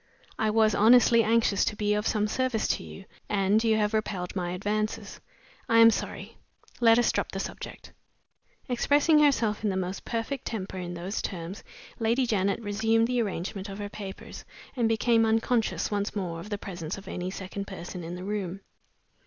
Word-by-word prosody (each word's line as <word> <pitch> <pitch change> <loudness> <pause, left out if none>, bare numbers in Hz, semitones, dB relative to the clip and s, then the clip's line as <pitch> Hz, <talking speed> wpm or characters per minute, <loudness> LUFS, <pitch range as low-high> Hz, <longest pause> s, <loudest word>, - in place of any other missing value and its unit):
I 220 - +2
was 215 0 +3
honestly 235 +2 +6
anxious 220 -2 +2
to - - -1
be 210 0 0
of 210 +1 0
some 210 -1 +1
service 255 0 0
to - - 0
you, 195 - -10 0.2
and 205 +2 +2
you 220 -1 +3
have 210 0 +1
repelled 200 -5 -2
my 180 -2 -2
advances. 210 +4 -3 0.5
I 230 - +4
am 230 0 +9
sorry. - - -5 0.4
Let 230 -1 +6
us 240 - +3
drop - - -2
the - - -4
subject." - - -7 0.7
Expressing 290 +5 +3
herself 235 -8 +2
in 210 - +2
the 190 - -1
most 185 +1 -3
perfect 235 +3 -3
temper 190 -4 -4
in 175 -1 -5
those 180 +4 -3
terms, 175 0 -6 0.4
Lady 235 +3 +2
Janet 200 -4 +1
resumed 225 +2 +2
the 245 0 +1
arrangement 195 -1 -4
of 195 - -7
her 205 -1 -5
papers, 195 -2 -8 0.3
and 235 -3 +1
became 225 +1 +3
unconscious 225 +1 +1
once 205 +1 -2
more 175 -5 -3
of 200 - -9
the 205 - -2
presence 180 -4 -6
of 195 0 -12
any 180 -1 -4
second 195 +1 -6
person 180 -1 -7
in 170 +2 -6
the 180 - -7
room. 195 -2 -3
210 Hz, 180 wpm, -27 LUFS, 190-225 Hz, 0.7 s, am